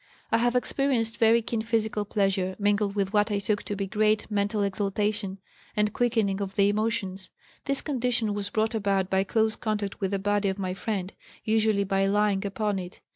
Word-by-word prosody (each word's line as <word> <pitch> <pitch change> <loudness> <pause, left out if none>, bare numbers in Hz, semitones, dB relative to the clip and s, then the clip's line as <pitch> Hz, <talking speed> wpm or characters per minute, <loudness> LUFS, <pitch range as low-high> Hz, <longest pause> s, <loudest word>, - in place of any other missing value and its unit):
I 230 - +4
have 240 +1 +1
experienced 250 -3 0
very 230 +1 +5
keen 225 0 -2
physical 220 -2 -1
pleasure, 195 -2 0
mingled 205 0 +1
with 200 0 -1
what 210 +1 +3
I 205 - +1
took 205 +1 -1
to 205 - -4
be 195 0 -2
great 215 +2 +1
mental 205 +1 0
exaltation 200 0 -1 0.4
and 210 0 +1
quickening 220 -5 +1
of 195 -1 -4
the 200 0 +4
emotions. 205 -3 -2 0.4
This 275 -1 +1
condition 245 -6 0
was 205 0 -2
brought 220 +2 0
about 195 -3 0
by 190 0 +3
close 220 +1 +1
contact 210 -3 -3
with 195 - 0
the 200 - 0
body 205 0 +1
of 190 - -3
my 185 -2 -2
friend, 195 -1 -3 0.3
usually 220 -2 +2
by 195 0 +1
lying 205 0 +2
upon 205 0 -1
it. 180 0 -8
205 Hz, 185 wpm, -27 LUFS, 195-220 Hz, 0.4 s, very